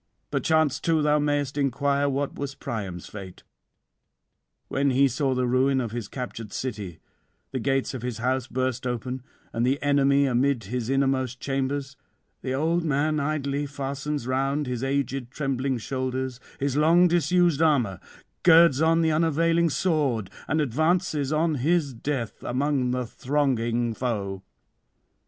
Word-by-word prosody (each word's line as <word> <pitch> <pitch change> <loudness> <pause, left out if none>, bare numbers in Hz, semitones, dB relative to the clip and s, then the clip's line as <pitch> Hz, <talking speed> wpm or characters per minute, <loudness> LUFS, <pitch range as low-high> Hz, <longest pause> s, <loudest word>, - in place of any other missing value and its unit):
'Perchance 155 -4 +2
too 160 -2 +1
thou 150 0 +3
mayest 145 -1 0
inquire 140 +1 +1
what 140 +1 -1
was 140 -1 -5
Priam's 100 -9 -5
fate. 95 -3 -10 1.2
When 140 +1 +1
he 135 +2 +4
saw 135 +1 0
the 125 0 +1
ruin 130 +2 +2
of 120 -4 -3
his 115 -3 -4
captured 115 -4 -6
city, 105 -9 -5 0.5
the 130 - -2
gates 135 +2 0
of 130 - -5
his 125 -2 -4
house 130 +2 -1
burst 130 -1 -2
open, 125 +2 -3 0.3
and 115 - 0
the 135 +3 +2
enemy 140 0 +4
amid 130 -1 +1
his 120 +3 -3
innermost 135 -2 +1
chambers, 135 +1 -2 0.4
the 130 - -3
old 165 +6 +1
man 155 0 +1
idly 145 -1 -1
fastens 140 0 -4
round 135 +3 0
his 125 -1 -3
aged 135 -2 -1
trembling 135 -1 -1
shoulders 130 +1 -3 0.2
his 140 -1 -1
long 165 +4 +5
disused 175 -2 +2
armour, 125 - +2 0.4
girds 165 -4 +6
on 165 +1 +4
the 160 - +3
unavailing 165 +1 +2
sword, 140 - 0 0.2
and 160 - +1
advances 155 +1 +1
on 155 0 +1
his 155 -2 +1
death 120 -1 -4
among 130 0 0
the 125 0 -1
thronging 120 -3 0
foe. 100 -6 -3
135 Hz, 140 wpm, -26 LUFS, 125-150 Hz, 1.2 s, girds